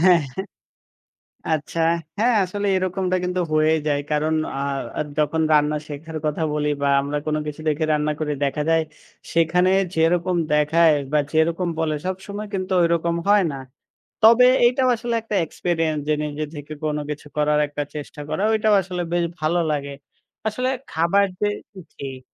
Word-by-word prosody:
হ্যাঁ, 175 -1 +6 1.3
আচ্ছা। 160 +2 -2 0.4
হ্যাঁ, 235 +3 +3
আসলে 205 +3 -3
এরকমটা 185 0 0
কিন্তু 180 0 -1
হয়ে 155 +1 +4
যায়। 145 -1 +1
কারণ 155 +1 +1 0.2
আ - - -2 0.4
আ - - +1 0.2
যখন 155 +2 +1
রান্না 150 0 +3
শেখার 155 +2 -7
কথা 150 +2 -1
বলি 150 0 0
বা 140 - +2
আমরা 145 +1 -2
কোন 155 0 0
কিছু 150 +1 -6
দেখে 155 +1 +1
রান্না 150 0 +1
করে 150 -1 -1
দেখা 145 +2 -1
যায়, 165 0 +4 0.5
সেখানে 170 +3 +3 0.2
যেরকম 175 +2 +2 0.2
দেখায় 155 +2 +4 0.2
বা 150 - +4
যেরকম 165 +3 +1
বলে 160 -1 0
সবসময় 200 +3 -5
কিন্তু 185 0 -2
ঐরকম 170 0 +1
হয় 205 -1 +5
না। - - -5 0.7
তবে 230 +3 +7 0.2
এইটাও 255 +1 +3
আসলে 235 +1 -3
একটা 220 -1 -4
এক্সপেরিয়েন্স 165 -3 -1
যে 155 - +3
নিজে 150 0 -3
থেকে 145 +1 -7
কোন 150 -1 0
কিছু 150 0 -6
করার 150 0 +2
একটা 145 0 -3
চেষ্টা 150 0 -7
করাটাও 215 +1 +2
আসলে 180 -1 -4
বেশ 175 -1 +2
ভালো 155 +3 +1
লাগে। 140 -1 -3 0.5
আসলে 250 +4 -1 0.2
খাবার 170 +5 +2 0.2
যে 210 - +3 0.5
ঠিক। 135 -2 -7
165 Hz, 155 wpm, -22 LUFS, 150-185 Hz, 1.3 s, তবে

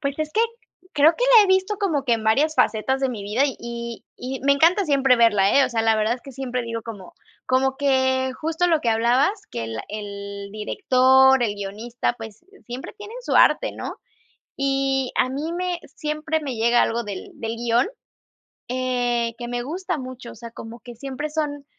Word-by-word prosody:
Pues 280 0 -3
es 310 0 -3
que 440 - +2 0.5
creo 305 +3 +5
que - - -1
la 420 - +7
he - - 0
visto 380 +2 +2
como 315 -9 0
que 240 - +3
en 220 -1 -5
varias 290 +8 +3
facetas 265 +5 +1
de 270 - +1
mi 220 -5 -5
vida 210 +7 0
y 235 -2 -6
y 260 +1 -5
me 280 - +4
encanta 335 +8 +4
siempre 270 -4 +3
verla, 210 0 +4
eh, - - +5
o - - -1
sea, 225 -1 0
la 225 -1 +3
verdad 215 +2 +1
es 250 - -11
que 275 - -11
siempre 250 -1 -3
digo 230 -1 -5
como 205 -5 -9 0.3
como 265 +1 +1
que 260 -1 +1
justo 325 +3 0
lo 325 -3 +2
que 235 - -1
hablabas, 245 - +2
que 115 - -4
el 115 0 -5
el 200 -1 -7
director, 260 - +4
el 210 -3 0
guionista, 215 +5 -3
pues, 225 +7 -10 0.2
siempre 245 +2 -7
tienen 420 +3 -9
su - - -2
arte, - - +4
¿no? - - -6 0.6
Y 270 -1 0
a 255 - +2
mí 300 +5 -3
me 360 -1 -2 0.2
siempre 305 +1 -2
me 270 -5 -4
llega 235 +2 +3
algo 235 +1 0
del 200 -2 -7
del 225 0 -4
guion, 240 +5 +2 0.8
eh, 245 -2 0
que 240 -1 -6
me 245 0 -3
gusta 355 +4 -3
mucho, 255 -2 -8
o - - -12
sea, 235 +1 -10
como 230 +1 -10
que 240 -1 -11
siempre 275 +4 -5
son 295 -2 -3
255 Hz, 200 wpm, -23 LUFS, 230-290 Hz, 0.8 s, la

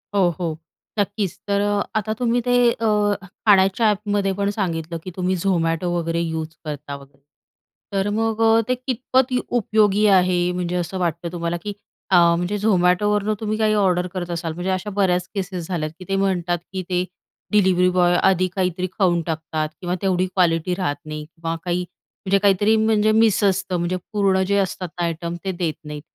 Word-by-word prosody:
हो, 190 -3 +4
हो. 165 -3 -2 0.4
नक्कीच. 205 -2 -1
तर 200 0 +1
अ, 205 0 +1
आता 215 0 -1
तुम्ही 245 -1 +2
ते 245 - +3 0.2
अ, 230 -1 -2 0.6
खाण्याच्या 195 +1 +4
ॲपमध्ये 205 -1 0
पण 200 0 +1
सांगितलं 165 -4 -2
की 185 - -7
तुम्ही 185 0 0
Zomato 165 -2 +1
वगैरे 165 0 -1
युज 160 -1 -3
करता 145 -1 -5
वगैरे. 140 0 -15 0.7
तर 195 0 0
मग 225 0 0
अ, 225 0 +5
ते 255 - +1
कितपत 255 +1 0
य 250 - +2 0.2
उपयोगी 210 -1 +2
आहे 180 -1 +2
म्हणजे 180 0 -2
असं 180 +1 -2
वाटतं 170 -1 -2
तुम्हाला? 170 0 -2
की 205 - -4 0.4
अ, - - +6 0.2
म्हणजे 175 +4 -1
Zomato 180 -2 +3
वरनं 210 +1 +1
तुम्ही 215 -1 -2
काही 215 -1 +2
ऑर्डर 180 -1 +1
करत 175 -1 -3
असाल, 165 -1 -4
म्हणजे 175 +3 -4
अशा 185 +3 -2
बऱ्याच 180 -2 +2
केसेस 185 -3 -4
झाल्यात 155 -4 -2
की 185 - -9
ते 195 - +1
म्हणतात 175 -2 0 0.2
की 190 - -2
ते 180 0 0 0.5
डिलिवरी 185 -3 +4
बॉय 175 -1 +4
आधी 185 -1 +3
काहीतरी 185 -1 -1
खाऊन 175 -3 +3
टाकतात 160 -1 -3
किंवा 180 0 -1
तेवढी 185 -2 +1
क्वालिटी 180 -2 +1
राहत 175 -6 -1
नाही 155 0 -6
किंवा 165 +1 -5
काही, 180 0 -1 0.4
म्हणजे 195 +1 +3
काहीतरी 205 +2 +4
म्हणजे 215 -1 +3
मिस 220 -1 +3
असतं 195 -2 +1
म्हणजे 175 +1 -1 0.2
पूर्ण 195 -2 +2
जे 200 +1 +2
असतात 190 -1 -1
ना - - 0
आयटम, 170 +1 -3
ते 190 - 0
देत 175 -3 -2
नाहीत. 150 -1 -7
185 Hz, 180 wpm, -22 LUFS, 170-205 Hz, 0.7 s, अ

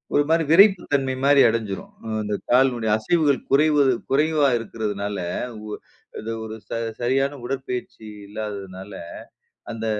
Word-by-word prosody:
ஒரு 145 - +5
மாதிரி 165 0 +3
விறைப்பு 190 +1 +7
தன்மைமாரி 135 +1 +3
அடஞ்சிரும். 105 -4 -3
அ - - -6 0.2
இந்த 105 0 -2
கால்னுடைய 125 -3 +3
அசைவுகள் 145 +5 +2
குறைவது 145 -2 +4 0.2
குறைவா 150 +1 +3
இருக்கிறதுனால, 105 -3 -4 0.5
உ - - -8 0.5
அது 115 +1 -5
ஒரு 110 0 -7
ச - - -16 0.3
சரியான 135 +3 +1
உடற்பயிற்சி 125 -3 -5 0.2
இல்லாததனால 100 -2 -7 0.8
அந்த 115 0 -5
125 Hz, 120 wpm, -23 LUFS, 110-145 Hz, 0.8 s, விறைப்பு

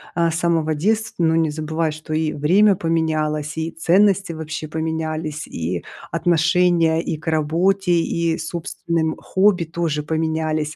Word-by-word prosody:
а, 170 -1 +2
с 160 - -2
самого 165 -3 +1
детства. 210 +4 -1
Но 160 0 +3
не 160 -2 +2
забывай, 155 +1 -2
что 155 +1 -9
и 155 -1 0
время 190 +8 +4
поменялось, 155 -2 -1
и 160 0 -2
ценности 190 +3 +2
вообще 155 -1 -5
поменялись, 160 -1 -3
и 85 +2 -4 0.3
отношение 170 0 +2
и 155 - -3
к 155 - -16
работе, 170 +5 +1
и 170 -1 +1
собственным 165 0 -2
хобби 190 -2 +2
тоже 160 -2 -2
поменялись. 155 0 -1
160 Hz, 140 wpm, -21 LUFS, 155-170 Hz, 0.3 s, время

